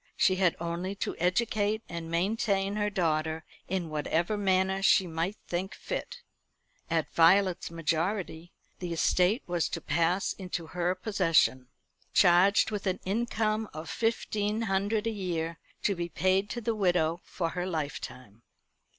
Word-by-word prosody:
She 185 -1 +3
had 180 -3 +3
only 170 +3 -3
to - - -3
educate 210 +3 +1
and 165 -1 -6
maintain 195 +3 0
her 210 0 0
daughter 160 -4 -1 0.2
in 180 -4 -2
whatever 160 +6 0
manner 190 -1 +1
she 195 -1 +5
might 170 +4 -2
think 185 +3 -3
fit. - - -5 0.7
At 165 -1 -1
Violet's 180 +2 +4
majority 165 +1 -2 0.3
the 175 -2 -3
estate 180 - +2
was 175 -2 0
to 165 - -3
pass 170 +4 +1
into 180 -3 -5
her 175 +3 -1
possession, 165 - +2 0.5
charged 190 +4 +5
with 205 -1 -3
an 185 0 0
income 215 +1 0
of 155 +1 -6
fifteen 220 -1 -1
hundred 205 +2 0
a 225 - 0
year, 170 -5 -3 0.2
to 200 - +2
be 170 -2 -4
paid 190 +3 +1
to 240 - -4
the 230 0 0
widow 175 -5 +1
for 170 -3 -3
her 180 +1 -3
lifetime. 135 - -5
185 Hz, 140 wpm, -29 LUFS, 165-205 Hz, 0.7 s, she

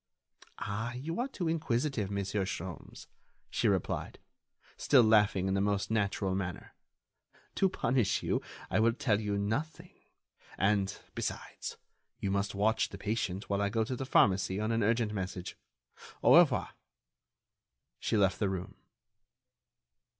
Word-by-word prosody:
"Ah! 110 +4 -3
you 150 - -4
are 250 - 0
too 190 -10 -4
inquisitive, 135 -8 0
Monsieur 100 0 -1
Sholmes," 95 -2 -6 0.5
she - - +1
replied, - - -1 0.6
still 130 -4 +5
laughing 105 -4 +4
in 95 - +1
the 95 - +1
most 100 +1 0
natural 100 -3 0
manner. 90 -3 -4 0.8
"To 195 - +2
punish 125 - +1
you - - 0 0.3
I - - +2
will 115 +1 +4
tell 110 -4 +1
you 105 -1 -1
nothing, 120 +11 -3 0.7
and, 100 0 +1 0.2
besides, - - -5 0.4
you 100 - -1
must 100 +1 -1
watch 110 +3 +2
the - - -8
patient 105 -3 -2
while 100 0 0
I 100 - +1
go 110 +1 +1
to 125 +4 -3
the 130 +1 -5
pharmacy 95 -5 +3
on 110 +1 -1
an 115 0 +1
urgent 110 0 +1
message. 95 -2 -4 0.7
Au - - +7
revoir." - - +5 1.3
She 110 - 0
left 95 -4 +2
the 100 - +1
room. 95 -2 -5
105 Hz, 140 wpm, -31 LUFS, 95-115 Hz, 1.3 s, Au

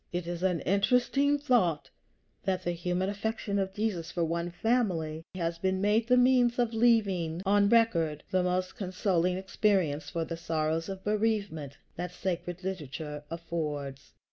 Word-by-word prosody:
It 175 -1 -3
is 175 0 -4
an 180 -4 +1
interesting 250 - +2
thought 240 - +1 0.5
that 185 -1 -1
the 175 - 0
human 180 +2 -1
affection 205 0 -2
of 190 -1 -1
Jesus 205 -6 -2
for 170 -2 -1
one 170 +1 -2
family 175 -6 0
has 170 -2 -2
been 190 +1 0
made 210 +3 +2
the 250 0 +5
means 250 -1 +4
of 240 -2 +1
leaving 195 -8 +2
on 200 +1 +4
record 170 -10 +2
the 185 - +3
most 180 0 -1
consoling 185 -2 0
experience 185 -7 0
for 165 +1 -2
the 165 +1 -5
sorrows 160 0 -1
of 190 -1 -6
bereavement 205 -9 -1 0.2
that 180 +1 -3
sacred 180 -1 -4
literature 150 -4 -5
affords. 150 -5 -5
185 Hz, 150 wpm, -29 LUFS, 165-210 Hz, 0.5 s, the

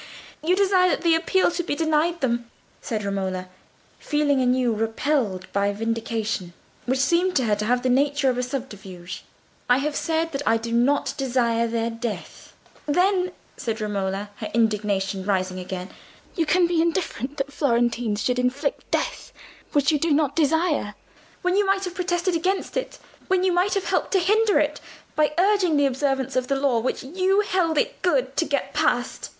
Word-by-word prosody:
You 345 +4 +2
desire 375 -2 +4
that - - 0
the 335 -1 +3
Appeal 350 +3 +2
should 350 0 -3
be - - 0
denied 320 +2 +1
them?" 240 -2 -1 0.3
said 215 -2 -3
Romola, 190 -2 -3 0.5
feeling 295 -3 +1
anew 250 -1 +2
repelled 225 -3 -1
by 200 0 +2
a 205 - -1
vindication 225 -4 -2 0.3
which 260 +2 +1
seemed 340 +7 +2
to 260 - +3
her 215 -3 +2
to 210 - -2
have 245 +2 +1
the - - +1
nature 280 +2 +2
of 250 -1 +1
a - - +1
subterfuge. 205 -9 -6 0.5
"I 250 - +6
have 295 +2 -2
said 325 +1 0
that 275 -2 -3
I 225 - +3
do 230 +1 -6
not 245 +5 +2
desire 240 -3 +1
their 230 0 -1
death." 230 -5 -6 0.4
"Then," 365 +4 +2 0.3
said 225 -3 -3
Romola, 200 -1 -3
her 215 - -5
indignation 205 -4 0
rising 185 -2 -1
again, 185 0 -6 0.4
"you 330 -5 0
can 360 +2 +4
be 340 -1 +1
indifferent 320 -5 -2
that 280 +1 -3
Florentines 235 -6 0
should 250 0 0
inflict 250 +3 -1
death - - -2 0.4
which 290 +1 +3
you 300 - +1
do 330 - 0
not 290 -2 +2
desire, 315 -8 +1 0.5
when 365 +1 +2
you 410 - +4
might 390 0 +1
have 365 -2 -4
protested 355 0 0
against 370 +4 -1
it—when 380 -6 -3
you 375 - +3
might 360 +3 +2
have 395 - -1
helped - - 0
to 385 - +4
hinder 420 +4 +3
it, - - 0 0.3
by 305 -1 +3
urging 370 -4 +3
the 285 - +4
observance 270 0 -1
of 255 -1 0
a - - +3
law 270 -4 +2
which 240 - -2
you 375 +8 +1
held 360 -6 0
it - - 0
good - - +1
to 330 - +2
get 285 -3 -2
passed. 295 -5 0
275 Hz, 180 wpm, -24 LUFS, 230-340 Hz, 0.5 s, I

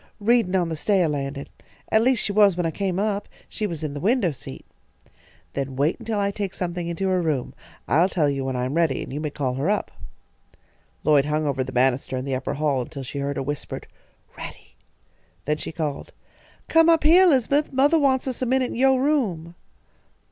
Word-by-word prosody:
"Readin' 215 -3 +2
on 175 -3 +1
the 160 - -3
stair 185 +2 +2
landin'. 140 -1 -3 0.5
At 220 - +4
least 250 -1 +3
she - - -1
was 200 -3 +4
when 175 - 0
I 165 - 0
came 190 0 -2
up. 205 0 -1 0.2
She 215 - -2
was 165 -5 -5
in 150 -2 -3
the 145 - -5
window 205 - +2
seat." 90 - -9 0.9
"Then 135 -1 -3
wait 145 +5 0
until 225 -2 -3
I 200 0 +1
take 200 -2 -4
something 175 -1 -3
into 170 +3 -2
her 185 -1 +1
room. 150 -7 -2 0.3
I'll 170 +6 +3
tell 165 -5 +1
you 140 -1 -1
when 130 -1 -2
I 125 0 -1
am 130 - -3
ready, 160 -5 +1
and - - -8
you 145 - -3
may 155 0 -2
call 135 -3 -2
her 135 +8 -1
up." 210 0 -1 1.1
Lloyd 145 -2 +4
hung 150 +1 -1
over 135 -2 0
the 130 - -7
banister 130 +1 +1
in 130 - -4
the 135 - -2
upper 130 0 -2
hall 140 -3 0
until 135 +2 -7
she 140 +2 -6
heard 140 0 -2
a - - -2
whispered 145 0 -5 0.5
"Ready;" - - -10 0.7
then 150 +1 0
she - - -5
called: 155 -3 -4 0.5
"Come 325 0 +5
up 330 -2 +4
heah, 345 +5 +7
Elizabeth, 285 -1 +2
mothah 285 +5 +3
wants 270 -2 +2
us 255 -1 -3
a 255 - 0
minute 255 0 +1
in - - -6
yo' 265 +1 +4
room." 225 - 0
170 Hz, 210 wpm, -24 LUFS, 140-220 Hz, 1.1 s, heah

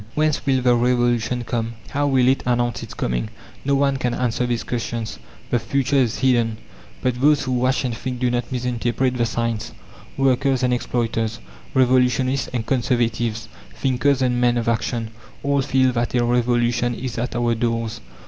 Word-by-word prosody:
Whence 155 -1 +1
will 130 -2 +2
the 125 -1 +5
revolution 120 0 +1
come? 115 -1 -3 0.2
how 145 +1 +1
will 130 -3 +3
it 135 +1 +3
announce 120 -3 0
its - - -8
coming? - - -2 0.3
No 140 0 +2
one 140 0 +2
can 125 -2 -1
answer 125 0 0
these 120 -1 -1
questions. 115 -2 -4 0.3
The 120 - +3
future 135 +4 0
is 125 -5 +2
hidden. 120 -4 +2 0.5
But 125 -1 0
those 145 0 +4
who 130 - -3
watch 130 +2 +1
and 120 -2 -2
think 125 +1 -5
do 125 -1 +1
not 120 0 -2
misinterpret 125 0 -1
the 120 -2 +1
signs: 115 -1 -2 0.4
workers 135 0 +2
and 125 0 +2
exploiters, 115 -2 -1 0.4
Revolutionists 130 +1 +3
and 120 -3 -3
Conservatives, 120 -3 0 0.3
thinkers 135 0 +1
and 125 -1 +1
men 120 -1 +3
of 115 - -2
action, 115 0 -1 0.3
all 140 0 +2
feel 130 -1 +2
that 120 0 -1
a 120 -1 +3
revolution 120 0 +1
is 125 -2 -4
at 120 +1 -3
our 120 -1 +1
doors. 115 -1 -2
125 Hz, 170 wpm, -22 LUFS, 120-130 Hz, 0.5 s, the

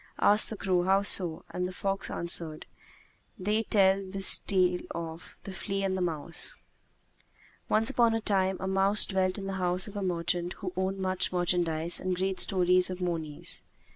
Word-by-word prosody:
Asked 210 +1 +4
the 220 - -7
crow, 185 -3 0
"How 195 +2 +2
so?" 175 -5 +2
and 180 0 -3
the - - -7
fox 195 +1 -3
answered:—They 170 +5 -5
tell 195 -2 +3
this 195 0 +2
tale 180 -2 +1
of 165 0 -8
The 195 - -8
Flea 195 +1 -4
and 190 -1 -1
the 185 - -3
Mouse 165 -2 +2 1.1
Once 220 +4 +3
upon 235 -3 +2
a - - 0
time 190 -3 +1
a 190 - -4
mouse 195 +2 +4
dwelt 190 -1 -1
in 195 - -6
the 195 - -4
house 180 +2 0
of 205 - -11
a 205 - -3
merchant 175 -1 -1
who 185 -2 -7
owned 190 +1 -2
much 185 -1 -1
merchandise 175 -2 0
and 185 0 -2
great 190 +1 -2
stories 180 -1 +3
of 185 0 -6
monies. 165 -4 -3
185 Hz, 170 wpm, -28 LUFS, 175-195 Hz, 1.1 s, Asked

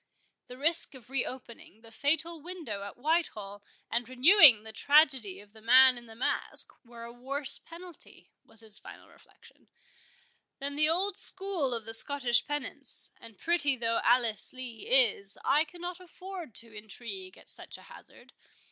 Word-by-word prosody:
"The 250 - -11
risk 315 +1 +2
of 250 -1 -15
re 270 -2 +1
opening 235 -4 -11
the 225 -1 -16
fatal 315 +6 -1
window 315 - -7
at 200 0 -9
Whitehall, 245 - -2 0.3
and 235 +1 -2
renewing 260 - +6
the 220 0 -8
tragedy 265 - +3
of 205 0 -17
the 220 - -16
Man 255 +3 +6
in 240 -1 -11
the 225 - -13
Mask, 235 - -1
were 235 -1 -13
a 235 0 -10
worse 270 +3 -1
penalty," 345 0 -13
was 225 - -13
his 215 -2 0
final - - -14
reflection, - - -22 0.9
"than 280 0 -6
the 305 +2 +3
old 380 +4 +1
stool 380 -8 -1
of 225 -2 -7
the 225 - -4
Scottish 250 0 +4
penance; 290 -1 -4
and 225 -3 -16
pretty 310 - 0
though 230 -2 -1
Alice 235 -3 +3
Lee 245 -4 -9
is, 220 -6 +4
I 300 +3 +3
cannot 350 +2 -8
afford 365 - -10
to 230 -1 -5
intrigue 205 -3 -9
at - - -18
such - - -6
a - - -16
hazard. - - -11
255 Hz, 165 wpm, -29 LUFS, 225-315 Hz, 0.9 s, renewing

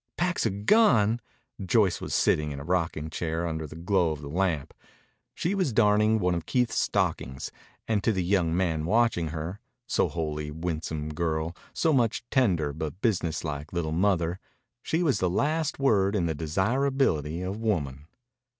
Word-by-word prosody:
"Packs 175 0 +1
a - - +1
gun!" 115 - +3 0.4
Joyce 95 -1 +2
was - - -3
sitting 75 -1 +2
in 70 - -5
a - - -7
rocking 80 -2 -1
chair 80 +1 -2
under 80 -1 -3
the 75 - -11
glow 90 +1 +1
of 75 -1 -4
the 70 - -6
lamp. 85 -5 -1 0.6
She 175 - -1
was 185 - 0
darning 105 0 +4
one 90 -4 +1
of 85 -2 -3
Keith's 125 -3 +1
stockings, 65 0 -1 0.4
and 105 -3 +1
to 115 - +3
the 95 -4 0
young 85 -2 +1
man 80 -4 0
watching 110 -4 +2
her 80 +5 -5 0.3
so - - +1
wholly 75 -2 -3
winsome 80 -1 -4
girl, 80 +1 -1 0.2
so 160 -2 +1
much 120 -3 +1
tender 85 - +2
but 80 +3 -5
business 85 -8 0
like 75 +1 -5
little 85 -3 -1
mother 90 0 +1 0.4
she 165 +6 0
was 145 -6 +2
the 90 - +1
last 150 - 0
word 105 -7 +2
in 90 -4 +1
the 80 - 0
desirability 95 - 0
of 95 +3 -3
woman. 75 -10 -2
90 Hz, 170 wpm, -27 LUFS, 80-110 Hz, 0.6 s, darning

